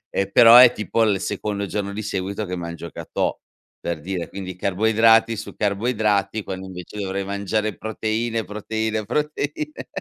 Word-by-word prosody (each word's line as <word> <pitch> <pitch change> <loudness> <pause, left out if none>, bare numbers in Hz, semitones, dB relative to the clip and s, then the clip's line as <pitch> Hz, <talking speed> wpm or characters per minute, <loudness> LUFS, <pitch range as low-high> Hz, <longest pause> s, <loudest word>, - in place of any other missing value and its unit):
ehm, 100 0 -1
però 115 -1 +8
è 125 -1 +10
tipo 110 +1 -1
il 100 -3 +2
secondo 105 0 -3
giorno 100 0 -3
di 110 - -4
seguito 100 0 -3
che 90 0 -4
mangio 85 -1 -6
gâteau, - - -3 0.4
per 85 -2 -3
dire, 90 0 -4
quindi 95 -1 -7
carboidrati 110 +4 +3
su - - -7
carboidrati, 105 -1 0
quando, 95 0 -6
invece, 90 +2 -9
dovrei 95 -1 -2
mangiare 100 +2 -2
proteine, 110 +1 -2
proteine 110 +1 -3
proteine 150 +2 -3
105 Hz, 150 wpm, -22 LUFS, 95-110 Hz, 0.4 s, è